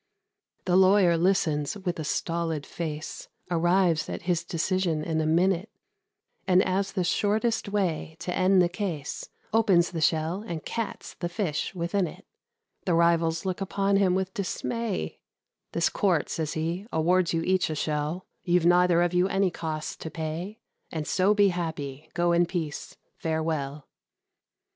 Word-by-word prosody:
The 180 Hz, -, +2 dB
lawyer 190 Hz, -2 st, +5 dB
listens 165 Hz, -3 st, +1 dB
with 180 Hz, -4 st, -3 dB
a -, -, -2 dB
stolid 165 Hz, 0 st, -2 dB
face, 155 Hz, -2 st, -5 dB, 0.2 s
Arrives 175 Hz, -1 st, +2 dB
at -, -, -5 dB
his 175 Hz, -1 st, 0 dB
decision 170 Hz, -2 st, 0 dB
in 160 Hz, 0 st, 0 dB
a 155 Hz, -, 0 dB
minute; 180 Hz, +5 st, +2 dB, 0.8 s
And, 185 Hz, 0 st, +5 dB
as 190 Hz, +1 st, -1 dB
the 185 Hz, -, 0 dB
shortest 215 Hz, +4 st, +1 dB
way 180 Hz, -6 st, -1 dB
to 180 Hz, -, -3 dB
end 185 Hz, 0 st, +4 dB
the -, -, +3 dB
case, 175 Hz, -6 st, -4 dB, 0.2 s
Opens 195 Hz, -6 st, +4 dB
the 165 Hz, -3 st, -3 dB
shell 160 Hz, +5 st, +1 dB
and 165 Hz, -5 st, -5 dB
cats 230 Hz, -2 st, -4 dB
the 175 Hz, -, -2 dB
fish 175 Hz, -2 st, -2 dB
within 175 Hz, +2 st, 0 dB
it. -, -, -11 dB, 0.6 s
The 175 Hz, -4 st, +2 dB
rivals 165 Hz, 0 st, +2 dB
look 185 Hz, 0 st, -2 dB
upon 195 Hz, +1 st, +1 dB
him 190 Hz, -2 st, +3 dB
with 190 Hz, 0 st, -1 dB
dismay: 205 Hz, -, -3 dB, 0.5 s
"This 170 Hz, -, +2 dB
Court," 180 Hz, -7 st, +1 dB
says 155 Hz, -2 st, -2 dB
he, 170 Hz, +6 st, -3 dB
"awards 175 Hz, +2 st, +2 dB
you 165 Hz, -1 st, 0 dB
each 185 Hz, -1 st, +2 dB
a 155 Hz, -, -2 dB
shell; 150 Hz, +4 st, -2 dB, 0.2 s
You've 175 Hz, -2 st, +2 dB
neither 175 Hz, 0 st, +5 dB
of 175 Hz, 0 st, 0 dB
you 180 Hz, +1 st, +3 dB
any 195 Hz, -1 st, +1 dB
costs 155 Hz, -2 st, -4 dB
to 160 Hz, -, -6 dB
pay, 165 Hz, +6 st, -5 dB, 0.3 s
And 155 Hz, -2 st, -3 dB
so 195 Hz, +3 st, +3 dB
be 205 Hz, -1 st, +5 dB
happy. 155 Hz, -6 st, -4 dB
Go 175 Hz, 0 st, +2 dB
in 170 Hz, 0 st, +3 dB
peace. 165 Hz, -5 st, -4 dB, 0.2 s
Farewell!" 155 Hz, -3 st, -2 dB
175 Hz, 155 wpm, -27 LUFS, 160-190 Hz, 0.8 s, lawyer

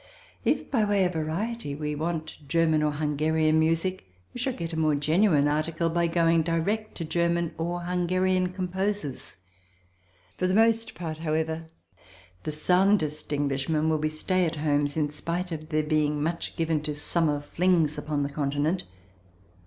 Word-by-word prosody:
If, -, -, 0 dB
by 230 Hz, -5 st, +3 dB
way 205 Hz, -2 st, +2 dB
of 180 Hz, -, -1 dB
variety, 165 Hz, +2 st, -3 dB
we 150 Hz, 0 st, -3 dB
want 160 Hz, +1 st, -3 dB
German 160 Hz, 0 st, +3 dB
or 150 Hz, -1 st, +1 dB
Hungarian 155 Hz, +1 st, +1 dB
music 165 Hz, -, 0 dB, 0.2 s
we -, -, -6 dB
shall 260 Hz, +2 st, 0 dB
get 170 Hz, -5 st, -5 dB
a 160 Hz, -, -1 dB
more 155 Hz, -2 st, +3 dB
genuine 155 Hz, +1 st, +3 dB
article 155 Hz, +2 st, 0 dB
by 170 Hz, 0 st, +2 dB
going 165 Hz, -1 st, +3 dB
direct 175 Hz, +7 st, -1 dB
to 165 Hz, -, -4 dB
German 170 Hz, 0 st, 0 dB
or 175 Hz, +2 st, -2 dB
Hungarian 185 Hz, +1 st, +1 dB
composers. 185 Hz, -, -3 dB, 1.0 s
For 185 Hz, -, +2 dB
the 185 Hz, -, +1 dB
most 225 Hz, +1 st, +3 dB
part, 160 Hz, -2 st, -5 dB
however, 160 Hz, 0 st, -1 dB, 0.8 s
the -, -, -1 dB
soundest 160 Hz, -2 st, +2 dB
Englishmen 145 Hz, +2 st, 0 dB
will 155 Hz, -1 st, +1 dB
be 155 Hz, 0 st, 0 dB
stay 185 Hz, +4 st, 0 dB
at 165 Hz, -, -3 dB
homes, 145 Hz, -1 st, 0 dB
in 150 Hz, -2 st, +1 dB
spite 170 Hz, +4 st, -3 dB
of 155 Hz, -1 st, -6 dB
their 155 Hz, -1 st, +1 dB
being 150 Hz, -1 st, +1 dB
much 165 Hz, +2 st, -2 dB
given 160 Hz, -2 st, 0 dB
to 150 Hz, -1 st, -3 dB
summer 150 Hz, 0 st, 0 dB
flings 165 Hz, 0 st, +1 dB
upon 150 Hz, -2 st, -1 dB
the 140 Hz, -, -2 dB
continent. 145 Hz, +4 st, -1 dB
160 Hz, 160 wpm, -27 LUFS, 150-180 Hz, 1.0 s, by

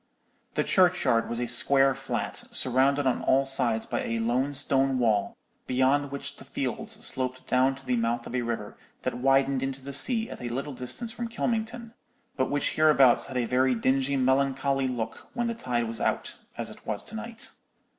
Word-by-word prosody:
"The -, -, +2 dB
churchyard 175 Hz, -11 st, +3 dB
was 120 Hz, -, -3 dB
a 125 Hz, -, 0 dB
square 135 Hz, +3 st, +3 dB
flat, -, -, -4 dB
surrounded 135 Hz, +3 st, +3 dB
on 130 Hz, -, +1 dB
all 135 Hz, +1 st, +3 dB
sides 120 Hz, -4 st, 0 dB
by -, -, -2 dB
a 115 Hz, -, -2 dB
low 120 Hz, +5 st, 0 dB
stone 135 Hz, -1 st, +2 dB
wall, 110 Hz, -5 st, +1 dB, 0.3 s
beyond 135 Hz, +3 st, +2 dB
which 140 Hz, -, -6 dB
the -, -, -12 dB
fields -, -, -4 dB
sloped 130 Hz, 0 st, -1 dB
down 130 Hz, +1 st, +2 dB
to 135 Hz, 0 st, -15 dB
the 125 Hz, -, +1 dB
mouth 115 Hz, +1 st, -1 dB
of -, -, -8 dB
a 125 Hz, -, 0 dB
river 115 Hz, -3 st, -4 dB, 0.3 s
that -, -, -1 dB
widened 135 Hz, 0 st, +3 dB
into 135 Hz, 0 st, -3 dB
the 140 Hz, +1 st, -6 dB
sea 225 Hz, -, +3 dB
at -, -, -9 dB
a 120 Hz, -, -4 dB
little 135 Hz, +4 st, -4 dB
distance 130 Hz, -, -5 dB
from 240 Hz, 0 st, -4 dB
Kylmington, 230 Hz, 0 st, -3 dB, 0.4 s
but 130 Hz, -, 0 dB
which 145 Hz, 0 st, 0 dB
hereabouts 145 Hz, -5 st, +4 dB
had 130 Hz, -, -5 dB
a 120 Hz, -, +1 dB
very 130 Hz, +1 st, +2 dB
dingy 135 Hz, +4 st, +1 dB
melancholy 135 Hz, +1 st, +1 dB
look 120 Hz, -3 st, -5 dB
when 240 Hz, -1 st, 0 dB
the 235 Hz, -, -1 dB
tide 120 Hz, -, -2 dB
was 115 Hz, -1 st, -6 dB
out, -, -, -1 dB, 0.2 s
as -, -, -4 dB
it -, -, -14 dB
was -, -, -2 dB
to -, -, -7 dB
night. -, -, -7 dB
130 Hz, 190 wpm, -27 LUFS, 125-140 Hz, 0.4 s, hereabouts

